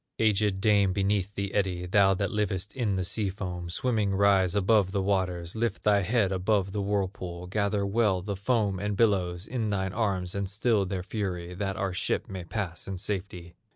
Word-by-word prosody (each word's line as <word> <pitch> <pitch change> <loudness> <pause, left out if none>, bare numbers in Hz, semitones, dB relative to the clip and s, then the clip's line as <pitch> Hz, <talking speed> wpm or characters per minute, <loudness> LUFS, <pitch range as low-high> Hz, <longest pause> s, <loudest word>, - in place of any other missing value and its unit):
Aged 105 -3 +2
dame 100 -3 +4
beneath 100 0 0
the 100 0 -3
eddy, 95 -3 0
Thou 95 +1 +4
that 100 0 -1
livest 100 -2 -2
in 115 -7 0
the 95 - -1
sea 100 +3 0
foam, 90 -3 -5
Swimming, 105 0 0
rise 95 -2 +3
above 100 -1 +3
the 100 - +1
waters, 90 -3 -1
Lift 110 -2 -1
thy 105 -1 +4
head 100 0 +1
above 95 +1 +1
the 105 0 -2
whirlpool, 95 -3 -2
Gather 100 +1 0
well 100 -3 +1
the 100 0 -3
foam 100 -2 0
and 105 0 -2
billows 95 -5 +1
In 115 -3 -2
thine 95 -2 -1
arms 95 -5 -1
and 100 -1 -2
still 105 -1 +1
their 90 -1 -3
fury, 90 -4 -4
That 95 +1 -3
our 95 -1 -1
ship 90 - -1
may 95 -2 -6
pass 90 -3 -4
in 95 -1 -4
safety! 90 -3 -4
100 Hz, 190 wpm, -28 LUFS, 95-105 Hz, -, dame